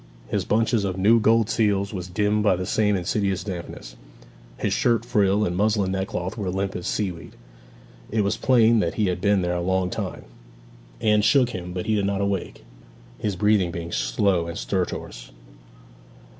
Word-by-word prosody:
His - - -1
bunch 115 +3 +1
of 100 -5 0
new 110 +5 +4
gold 115 0 +3
seals 105 -3 0
was 90 -2 -5
dimmed 105 +3 0
by 105 -3 +3
the 90 +1 -4
same 105 +1 +1
insidious 95 +1 -1
dampness; 85 - -7 0.6
his - - -1
shirt 115 -2 +1
frill 105 -3 +2
and 90 - -2
muslin 105 -1 +1
neckcloth 95 -1 -3
were 100 -3 -2
limp 95 +1 -2
as 90 - -4
seaweed. 90 -5 -3 0.7
It 110 0 +1
was 100 +2 0
plain 115 -3 +4
that 85 -5 -1
he 105 -4 +1
had 90 0 -3
been 100 -2 +2
there 90 0 -1
a 90 - -1
long 95 0 0
time. - - -5 0.8
Anne 105 -1 +3
shook 125 +2 +3
him, 90 -3 -6
but 90 0 -4
he 110 - 0
did 100 -2 +1
not 100 -1 -1
awake, 100 -8 -3 0.5
his 105 -3 -2
breathing 105 -2 +2
being 85 0 -6
slow 85 +9 0
and 85 - -6
stertorous. - - -4
100 Hz, 175 wpm, -24 LUFS, 90-105 Hz, 0.8 s, new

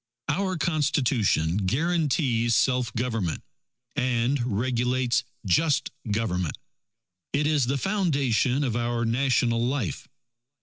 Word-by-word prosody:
Our 190 -1 0
Constitution 130 - +1
guarantees 130 - +1
self 125 -3 +2
government, 115 -8 -2 0.5
and 125 0 +1 0.2
regulates 125 0 +1 0.2
just 140 - +2 0.2
government. 95 -6 -1 0.8
It 145 +1 +1
is 150 -5 +2
the 140 +2 0
foundation 140 - +1
of 120 -5 -1
our 120 0 -1
national 120 -1 +1
life. 120 - -2
125 Hz, 95 wpm, -26 LUFS, 115-145 Hz, 0.8 s, self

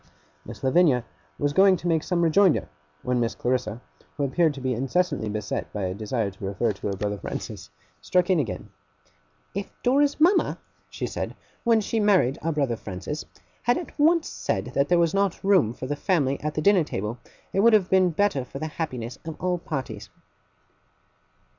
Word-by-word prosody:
Miss 115 +3 -9
Lavinia 135 -3 +3 0.3
was 145 0 0
going 190 +3 +6
on - - +1
to 175 - -5
make 165 -2 +2
some 175 +1 0
rejoinder, 170 +1 +4 0.4
when 125 -1 0
Miss 115 0 0
Clarissa, 125 -2 -1 0.4
who 145 - 0
appeared 155 +2 +2
to - - -7
be 130 -1 -1
incessantly 135 0 0
beset 105 -1 -3
by 105 - -3
a 90 - -2
desire 110 +1 -2
to 95 - -14
refer 100 +3 0
to 100 - -6
her 100 - -1
brother 100 +1 -3
Francis, - - -6 0.3
struck 180 - +2
in 180 - +4
again: 130 -7 -4 0.8
'If 200 0 -4
Dora's 280 +4 +3
mama,' 355 +5 +4 0.3
she - - -4
said, - - -4 0.3
'when 230 -2 +4
she 225 +2 -1
married 190 - +3
our 165 +3 0
brother 140 -7 0
Francis, 105 +10 -6 0.4
had 245 +1 +2
at 350 - -6
once 325 +2 +4
said - - -3
that 140 +1 +1
there 175 - +4
was 170 -1 +2
not 195 -2 0
room 190 - +4
for 125 - -7
the 145 +3 -2
family 145 -6 0
at 150 0 -3
the 155 - -1
dinner 200 -4 +5
table, 110 -4 -4 0.3
it - - +1
would 230 +3 +6
have 205 -4 +4
been 190 -1 +5
better 170 -5 +1
for 130 - -9
the 155 - -4
happiness 130 -7 -5
of 160 -1 -7
all 180 -1 0
parties. 110 -10 -5
150 Hz, 190 wpm, -25 LUFS, 120-185 Hz, 0.8 s, going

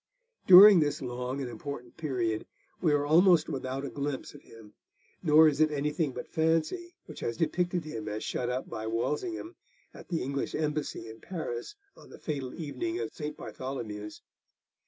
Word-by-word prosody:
During 195 +1 +11
this 150 -2 +1
long 125 +1 -4
and 130 - -3
important 125 -1 -7
period 125 -8 -2 0.3
we 165 - +3
are 145 -1 +2
almost 170 +1 +5
without 135 -1 -3
a - - -4
glimpse 140 -1 -4
of - - -13
him, 110 -2 -15 0.5
nor 155 -1 +7
is 150 0 +1
it 155 - +5
anything 150 +1 -1
but 125 - -7
fancy 165 - 0
which 155 - -10
has 115 -1 -3
depicted 175 +1 0
him 110 -8 -6
as 105 +1 -4
shut 125 - -2
up 125 +1 -3
by 110 0 -5
Walsingham 240 - -2 0.4
at - - -12
the 165 - -2
English 140 +1 -3
embassy 150 -5 -2
in 110 0 -10
Paris 160 - -5 0.2
on - - -16
the - - -12
fatal 140 -5 -4
evening 335 - -3
of - - -4
St. 150 -1 -5
Bartholomew's. 110 -6 -6
145 Hz, 170 wpm, -29 LUFS, 125-160 Hz, 0.5 s, During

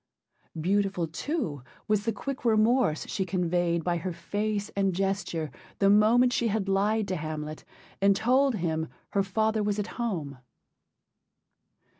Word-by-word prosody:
Beautiful, 195 +1 +1
too, 165 - -3 0.3
was 210 -1 +1
the 225 - +2
quick 265 +6 -5
remorse 225 -6 +3
she 190 - -2
conveyed 175 -2 0
by 175 0 0
her 180 +2 -3
face 205 +4 -2
and 195 -2 0
gesture 190 -5 -1 0.3
the 195 -1 +4
moment 235 +4 +5
she 235 - +1
had 210 -2 -1
lied 205 +2 +1
to 185 - 0
Hamlet 155 -1 -5 0.4
and 200 0 +5
told 255 +4 +3
him 160 -4 -1 0.2
her 200 - +2
father 215 +3 0
was 205 -1 0
at 210 +3 -4
home. 160 - -3
195 Hz, 140 wpm, -28 LUFS, 170-220 Hz, 0.4 s, moment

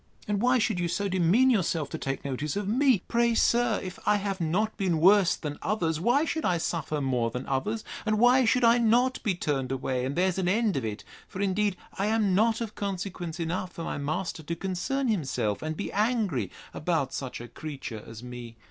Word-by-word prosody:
And 205 -1 0
why 250 +1 +4
should 220 -5 0
you 175 - 0
so 185 +4 -1
demean 190 +8 +4
yourself 170 - +1
to - - -3
take 135 +1 -4
notice 140 +2 -3
of 205 -1 -2
me? 245 -2 +3
Pray, 235 0 +2
sir, 235 -1 +3
if 185 -1 -7
I 210 - +3
have 200 -2 -2
not 190 +7 0
been 180 -5 0
worse 190 +1 +5
than 145 -2 -6
others, 170 -6 0
why 245 - +3
should 320 -1 -2
I 180 -2 +2
suffer 160 -2 -2
more 125 -4 0
than 125 +3 -5
others? 210 +12 -2 0.2
and 215 0 +1
why 245 +3 +5
should 250 +2 +2
I 235 +1 +6
not 240 +3 +3
be 205 -5 0
turned 135 -6 -2
away, 130 -1 -1
and 135 +2 -2
there's 185 +1 +1
an 180 - 0
end 215 0 +2
of 135 - -1
it? 105 -1 -4 0.2
For 185 - -8
indeed 200 0 +1 0.2
I 200 - +1
am 215 -3 +2
not 225 +4 +2
of 225 -2 -4
consequence 185 -4 -4
enough 175 +2 -3
for 165 - -6
my - - -3
master 155 +4 -3
to 165 +2 -4
concern 195 +10 -2
himself, 135 - -1
and 155 0 -4
be 205 - -4
angry 205 - 0 0.2
about - - -1
such - - -5
a 120 - -8
creature 130 -4 -7
as 115 +1 -10
me. 120 -2 -8
185 Hz, 210 wpm, -28 LUFS, 150-220 Hz, 0.2 s, I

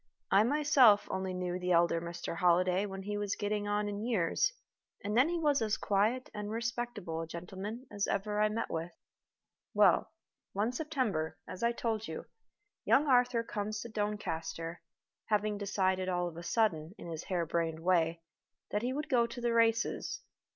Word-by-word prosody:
I 195 - +6
myself 265 -4 +5
only 190 0 -2
knew 180 0 -2
the 180 0 +1
elder 170 0 +3
Mr. 170 0 -5
Holliday 180 +3 +3
when 195 -1 -6
he 205 +1 -3
was 205 -1 -1
getting 205 0 -2
on 205 0 0
in 205 +1 -4
years, 220 - +1 0.5
and 210 +1 -2
then 260 +7 +5
he 345 - 0
was 295 -5 +2
as 220 -1 +1
quiet 215 +6 +1
and 210 -1 -4
as 210 - -4
respectable 230 -7 -3
a 165 - -5
gentleman 190 +8 -6
as 205 -1 -1
ever 210 +1 0
I 215 - +4
met 220 +2 -3
with. 165 +1 -3 0.8
Well, - - +4 0.4
one 210 +4 0
September, 250 - -2
as 185 - -8
I 235 0 +3
told 225 -2 -2
you, - - -6 0.6
young 295 - +4
Arthur 250 -3 +3
comes 215 -2 -3
to 235 - -7
Doncaster, 170 -6 -3 0.4
having 210 -1 0
decided 190 -2 0
all 175 -1 0
of 170 - -7
a 170 - -7
sudden, 175 -2 0
in - - -10
his 165 -2 -6
hare 175 -3 -1
brained 165 0 -1
way, 165 -2 +2 0.5
that 210 - 0
he 250 +2 -1
would 300 +3 -3
go 245 -5 +3
to 235 +1 -8
the 240 -1 0
races. 230 0 +1
205 Hz, 180 wpm, -32 LUFS, 175-230 Hz, 0.8 s, I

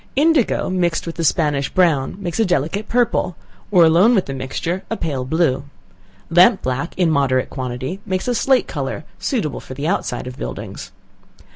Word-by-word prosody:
Indigo 295 -3 +2
mixed 175 -2 0
with 165 - -4
the 165 - -4
Spanish 145 -3 +1
brown 165 -8 +2
makes 175 -3 -4
a - - +5
delicate 180 +4 -1
purple, 235 -7 +1 0.3
or 180 -4 +6
alone 180 +9 +5
with 190 - +2
the 135 - -5
mixture, 135 +7 -3
a 225 - -2
pale 140 -6 -2
blue. 140 -2 +1 0.7
Lamp 180 +3 +5
black, 130 +6 -3
in 175 -3 +3
moderate 135 -3 +1
quantity, 130 +6 -4
makes 190 0 -3
a 245 - +1
slate 265 +2 +2
color, 140 0 -4 0.2
suitable 215 - -2
for 130 - -10
the 145 +3 -3
outside 165 -10 -1
of 125 +1 -8
buildings. - - -6
165 Hz, 170 wpm, -20 LUFS, 135-190 Hz, 0.7 s, or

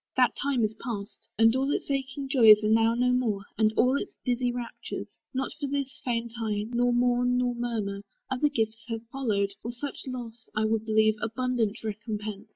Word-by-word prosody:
That - - +4
time 275 -4 0
is 215 0 +1
past, 210 -4 -6
And 225 +1 +5
all 270 +1 +1
its 290 - -2
aching 275 0 -2
joys 225 -6 +7
are 215 - +2
now 225 +1 +4
no 250 +1 +2
more, 225 -6 0
And 215 -1 +3
all 255 +2 +4
its - - -4
dizzy 245 -1 +1
raptures. 240 -1 -6
Not 265 0 -2
for 285 - -2
this 275 -1 -3
Faint 235 -2 -2
I, 210 -2 -1
nor 245 0 +2
mourn 245 0 +2
nor 250 0 +1
murmur: 225 -5 -3 0.3
other 265 +3 +1
gifts 225 -4 -1
Have 230 -1 -4
followed, 205 -7 0
for 235 - -5
such 270 +3 -6
loss, 240 -3 -7
I 215 0 +2
would 220 0 0
believe, 215 0 +4
Abundant 230 -1 -1
recompence. 215 -1 -5
235 Hz, 185 wpm, -28 LUFS, 220-250 Hz, 0.3 s, joys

